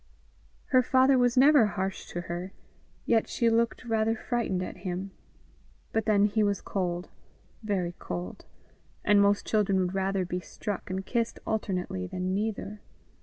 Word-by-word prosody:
Her 255 Hz, -1 st, +5 dB
father 260 Hz, +2 st, +4 dB
was 245 Hz, 0 st, +2 dB
never 275 Hz, -3 st, +7 dB
harsh 195 Hz, -1 st, -3 dB
to 175 Hz, -, -4 dB
her, 175 Hz, +2 st, -5 dB, 0.5 s
yet 225 Hz, -2 st, +2 dB
she 235 Hz, -1 st, +2 dB
looked 230 Hz, +2 st, +1 dB
rather 225 Hz, -1 st, +1 dB
frightened 220 Hz, -6 st, -1 dB
at -, -, -7 dB
him; 185 Hz, +1 st, -4 dB, 0.8 s
but 225 Hz, -, +1 dB
then 205 Hz, -2 st, +4 dB
he 210 Hz, +1 st, +1 dB
was 205 Hz, -2 st, +1 dB
cold, 180 Hz, -2 st, -3 dB, 0.5 s
very 190 Hz, -5 st, -1 dB
cold, 90 Hz, 0 st, -6 dB, 0.6 s
and 205 Hz, 0 st, +5 dB
most 200 Hz, 0 st, +3 dB
children 205 Hz, -3 st, +2 dB
would 185 Hz, -1 st, 0 dB
rather 195 Hz, -1 st, 0 dB
be 180 Hz, +1 st, -3 dB
struck 195 Hz, +2 st, -6 dB
and 190 Hz, +1 st, -3 dB
kissed 235 Hz, +1 st, -1 dB
alternately 180 Hz, -, -2 dB
than 185 Hz, -, -3 dB
neither. 210 Hz, 0 st, -3 dB
200 Hz, 150 wpm, -28 LUFS, 185-225 Hz, 0.8 s, never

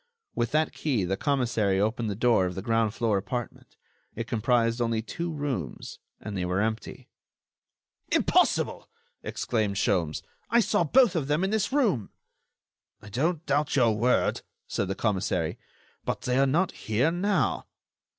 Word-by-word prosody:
With 120 Hz, -, 0 dB
that 155 Hz, +1 st, +1 dB
key 130 Hz, -10 st, 0 dB
the 95 Hz, +2 st, 0 dB
commissary 115 Hz, -7 st, +1 dB
opened 110 Hz, +2 st, 0 dB
the 100 Hz, -, -2 dB
door 115 Hz, -4 st, +3 dB
of 90 Hz, -, -5 dB
the 95 Hz, -, -5 dB
ground 115 Hz, -1 st, +1 dB
floor 110 Hz, -4 st, +1 dB
apartment. 120 Hz, +3 st, -6 dB, 0.4 s
It 115 Hz, -, -3 dB
comprised 115 Hz, +1 st, +1 dB
only 115 Hz, -1 st, 0 dB
two 170 Hz, +8 st, -4 dB
rooms 140 Hz, -, -4 dB, 0.2 s
and 105 Hz, -, -6 dB
they 95 Hz, -, -1 dB
were 90 Hz, +1 st, 0 dB
empty. 110 Hz, 0 st, -3 dB, 1.0 s
"Impossible!" -, -, +2 dB, 0.3 s
exclaimed 110 Hz, -4 st, -1 dB
Sholmes. 90 Hz, -6 st, 0 dB, 0.3 s
"I 235 Hz, -, +4 dB
saw 210 Hz, -4 st, +2 dB
both 230 Hz, -, +4 dB
of 150 Hz, -5 st, -1 dB
them 150 Hz, +5 st, +1 dB
in 190 Hz, -, 0 dB
this 215 Hz, +1 st, 0 dB
room." 220 Hz, -, +1 dB, 0.9 s
"I 105 Hz, -, -12 dB
don't 155 Hz, -, -1 dB
doubt 145 Hz, +2 st, +1 dB
your 120 Hz, -5 st, +4 dB
word," 120 Hz, +4 st, +1 dB, 0.3 s
said 100 Hz, -, -2 dB
the 95 Hz, -, -2 dB
commissary; 100 Hz, -3 st, -1 dB, 0.4 s
"but -, -, -3 dB
they 125 Hz, +1 st, +1 dB
are 135 Hz, -, +4 dB
not 170 Hz, +7 st, +2 dB
here 115 Hz, +9 st, 0 dB
now." 195 Hz, +4 st, 0 dB
120 Hz, 155 wpm, -27 LUFS, 105-150 Hz, 1.0 s, I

